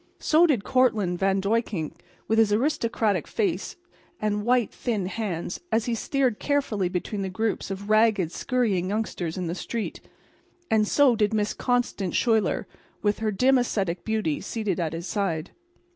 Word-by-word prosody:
So 325 +3 +4
did 255 -10 +1
Cortlandt 215 -9 +2
Van 195 0 +2
Duyckink, 200 -5 -1 0.3
with 225 0 +2
his 220 -2 +4
aristocratic 225 - +1
face 195 -4 -1 0.4
and 210 -1 -1
white, 240 -1 +2
thin 215 -6 -2
hands, 185 -4 -3
as 225 0 +2
he 240 - -1
steered 255 0 0
carefully 235 -10 0
between 190 +3 -3
the 190 - -2
groups 220 +3 -2
of 195 +1 -5
ragged, 215 -5 +3
scurrying 205 -8 0
youngsters 195 -5 -2
in 180 - -2
the 165 - -2
streets. 225 +4 -4 0.7
And 215 -1 +3
so 275 -1 +4
did 210 0 +1
Miss 210 -1 0
Constance 245 -7 0
Schuyler, 225 -3 +2 0.4
with 205 -1 +1
her 220 -1 0
dim, 255 +6 +4
ascetic 195 -7 -1
beauty, 215 -9 -1
seated 210 -6 -2
at 165 -2 -1
his 165 +1 -5
side. 185 -6 -2
210 Hz, 160 wpm, -26 LUFS, 190-230 Hz, 0.7 s, So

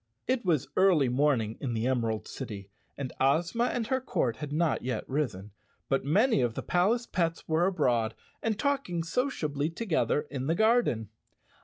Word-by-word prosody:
It 255 -1 0
was 160 -7 +1
early 175 -9 +4
morning 125 -4 +1
in 120 -4 -2
the 110 +1 -1
Emerald 115 -4 0
City, 100 -2 -7 0.3
and 135 -3 -5
Ozma 170 - +2
and 245 -2 -1
her 260 +3 0
court 120 - -1
had 150 -1 -6
not 160 +2 +1
yet 125 0 -3
risen, 110 -9 -2 0.4
but 135 - +1
many 205 - +3
of 120 -2 0
the - - -4
palace 210 +7 +2
pets 165 -5 -2
were 165 +3 +2
abroad 120 -11 +1 0.3
and 220 -2 0
talking 270 - -1
sociably 165 - -1
together 165 -5 0
in 135 -2 -3
the 165 - +2
gar¬ 230 +5 +4
den. 110 - -3
150 Hz, 170 wpm, -29 LUFS, 125-195 Hz, 0.4 s, early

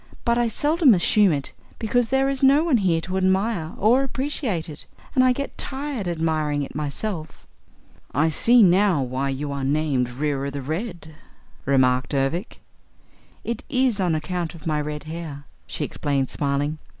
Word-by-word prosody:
But 235 0 +2
I 240 - +2
seldom 290 - +4
assume 195 +2 +4
it 140 -3 -2 0.2
because 235 +1 0
there 265 0 +2
is 275 -1 -1
no 280 +3 +5
one 320 -7 +3
here 175 -6 +1
to 185 +3 -3
admire 190 -2 0
or 235 +6 +4
appreciate 265 - -2
it 150 -2 -10 0.3
and 255 - +4
I 255 - +5
get 280 +3 -4
tired 270 -7 -3
admiring 155 -3 0
it - - -8
myself." 155 +4 -5 0.7
"I 155 +4 +2
see 235 +9 +5
now 185 -4 +4
why 130 +2 -2
you 140 +2 -3
are 140 -1 -4
named 140 -3 0
Reera 140 +2 -2
the 140 -1 -6
Red," 165 - -5 0.5
remarked 130 0 +2
Ervic. 140 - -2 0.8
"It 235 0 -4
is 255 -5 +1
on 175 -4 +1
account 170 +1 -3
of 160 - -13
my 155 -2 0
red 150 0 -5
hair," 155 -3 -7 0.2
she - - -3
explained 140 -2 -2
smiling. 145 +2 -1
165 Hz, 160 wpm, -23 LUFS, 145-230 Hz, 0.8 s, no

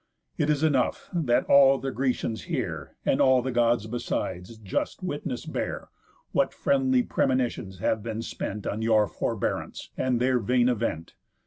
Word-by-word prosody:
It 150 - 0
is 150 0 +1
enough, 140 -5 +1
that 145 -9 +2
all 135 -1 +6
the 135 0 -3
Grecians 125 -4 -2
here, - - -4
And - - +2
all 130 -1 +5
the 130 - -2
Gods 120 -2 +2
besides, 110 -3 -4
just 100 -4 -3
witness - - -4
bear, - - -4 0.4
What - - +1
friendly 130 -2 +2
premonitions 120 -9 -1
have 110 +4 0
been 115 +1 -4
spent 105 -2 -5
On 110 - -2
your 110 -2 +3
forbearance, - - -3
and 125 -2 0
their 125 0 +2
vain 125 +3 +2
event. 110 -9 -2
120 Hz, 150 wpm, -26 LUFS, 110-130 Hz, 0.4 s, all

